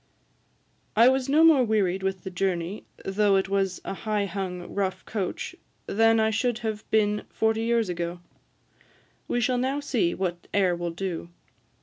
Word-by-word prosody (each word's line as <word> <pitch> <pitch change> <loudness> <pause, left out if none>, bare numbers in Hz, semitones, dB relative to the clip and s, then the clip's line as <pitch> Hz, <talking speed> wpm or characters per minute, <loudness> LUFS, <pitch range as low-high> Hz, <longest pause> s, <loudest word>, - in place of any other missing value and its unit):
I 230 +3 +7
was 265 0 0
no 305 +3 +5
more 315 -6 +7
wearied 200 -5 +1
with 190 -1 -2
the 190 - -6
journey, 180 +1 -2 0.2
though 200 +1 +2
it 190 0 +1
was 195 -2 0
a - - -3
high 210 +1 -1
hung, 185 -2 -5
rough 195 -2 -2
coach, 200 -5 -4 0.3
than 225 +2 +3
I 220 0 +3
should 225 +2 0
have 215 -1 -4
been 210 -1 +2
forty 220 0 +1
years 230 -1 +1
ago. 175 0 -3 1.1
We 245 - 0
shall 245 +1 +1
now 265 +3 0
see 235 -12 0
what 175 -2 -3
air 185 -3 +3
will 175 0 -3
do. 170 0 -4
200 Hz, 160 wpm, -26 LUFS, 185-225 Hz, 1.1 s, I